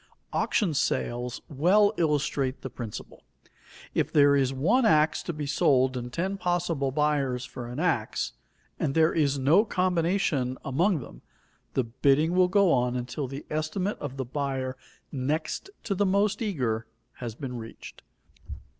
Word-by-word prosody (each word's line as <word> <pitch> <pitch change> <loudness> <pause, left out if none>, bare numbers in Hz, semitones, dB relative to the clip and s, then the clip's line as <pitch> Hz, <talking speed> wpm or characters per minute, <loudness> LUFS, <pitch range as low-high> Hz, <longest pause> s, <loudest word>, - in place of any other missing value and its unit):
Auction 185 -7 +1
sales 120 -3 -1
well 190 +9 +3
illustrate 145 -5 0
the 130 - -5
principle. 115 -4 -8 0.7
If - - 0
there 145 -1 +5
is 135 -2 +2
one 185 - +2
ax 155 -7 +3
to - - -4
be 150 -2 -5
sold 130 -2 +3
and 125 -1 -5
ten 190 +7 -2
possible 175 -6 0
buyers 140 -3 0
for 125 -1 -8
an 120 +4 -6
ax, 155 -11 0 0.5
and 135 - -1
there 160 0 +4
is 145 -3 +2
no 150 +10 +5
combination 175 - 0
among 165 +5 +1
them, - - -12 0.5
the 130 - +2
bidding 140 +7 +2
will 180 0 +5
go 195 -1 +4
on 125 -1 +2
until 125 +3 -3
the 135 +3 -7
estimate 155 +6 -2
of 140 -2 -6
the 130 - -2
buyer 130 -1 -3 0.4
next 150 - -2
to 205 - -1
the 200 +1 +1
most 200 +4 +1
eager, 125 - -1 0.3
has 120 -3 -6
been 125 -1 -5
reached. 115 -1 -10
145 Hz, 150 wpm, -27 LUFS, 130-175 Hz, 0.7 s, there